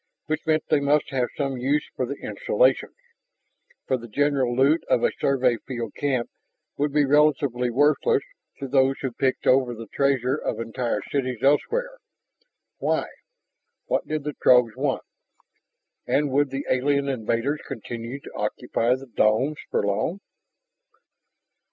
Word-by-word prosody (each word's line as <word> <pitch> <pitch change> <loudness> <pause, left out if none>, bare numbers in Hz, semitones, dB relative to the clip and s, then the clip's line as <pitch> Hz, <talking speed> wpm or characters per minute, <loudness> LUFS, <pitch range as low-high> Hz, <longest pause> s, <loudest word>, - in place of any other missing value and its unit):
Which 155 0 -3
meant 155 -1 +2
they 150 - +4
must 145 +2 +1
have 125 -2 0
some 135 -3 -1
use 140 +4 0
for 130 - -1
the 140 - -4
installations. - - +1 0.9
For 130 - +1
the 120 -1 -10
general 135 0 +1
loot 140 +6 +3
of - - +3
a - - +3
Survey 130 -3 +2
field 120 -4 -4
camp 130 -4 -1 0.5
would 145 +1 0
be 145 0 +3
relatively 140 -4 +2
worthless 150 - +2 0.3
to 135 - -5
those 135 0 +3
who 130 - -1
picked 130 +2 -1
over 130 -2 +3
the 115 +1 -8
treasure 135 -2 +1
of 150 - -3
entire 115 -1 -2
cities 130 -4 -2
elsewhere. - - +1 0.8
Why? - - 0 0.8
What - - -1
did 155 -1 -2
the 150 0 -3
Throgs 125 -3 +5
want? - - -1 1.0
And 145 -1 +1
would 145 +1 +2
the 135 +1 -4
alien 140 +2 +1
invaders 130 +3 -1
continue 120 +1 -6
to - - -11
occupy 115 +3 0
the 135 +1 -9
domes 125 +5 +1
for - - 0
long? 105 - -1
135 Hz, 145 wpm, -24 LUFS, 125-145 Hz, 1.0 s, Throgs